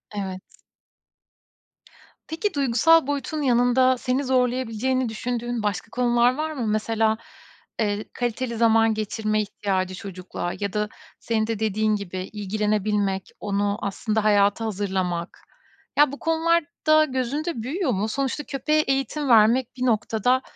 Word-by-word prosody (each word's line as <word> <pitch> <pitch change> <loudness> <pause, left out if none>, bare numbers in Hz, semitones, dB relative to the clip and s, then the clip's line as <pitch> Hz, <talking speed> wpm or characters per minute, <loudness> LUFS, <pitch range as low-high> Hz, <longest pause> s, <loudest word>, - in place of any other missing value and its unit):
Evet. 190 -2 -4 1.9
Peki 340 +6 -2
duygusal 280 +3 +4
boyutun 285 +2 -2
yanında 255 0 +3
seni 255 +3 -1
zorlayabileceğini 255 -1 0
düşündüğün 240 +1 -3
başka 205 +1 -2
konular 240 0 +3
var 310 +2 -2
mı? 255 -7 -3
Mesela, 220 +1 +1 0.6
eee, 210 -1 0
kaliteli 240 0 -2
zaman 225 -1 +4
geçirme 215 0 -1
ihtiyacı, 190 -2 -2
çocukla 185 -3 -6
ya 200 -2 -3
da 210 0 -1 0.3
senin 220 -1 -1
de 225 -2 -2
dediğin 215 0 +1
gibi 200 -3 -6 0.2
ilgilenebilmek, 210 -1 -1
onu 200 0 -1
aslında 215 +2 -1
hayata 205 +1 +3
hazırlamak. 185 -5 -2 0.6
Ya, 295 -2 +5
bu 285 - -8
konular 325 +1 +2 0.2
da 310 0 +6
gözünde 265 +1 -2
büyüyor 300 - -1
mu? 205 0 0
Sonuçta 275 +4 -2
köpeğe 300 +2 0
eğitim 270 +1 -1
vermek 235 +3 +4
bir 255 - -1
noktada, 230 +2 +1
225 Hz, 125 wpm, -24 LUFS, 210-260 Hz, 1.9 s, da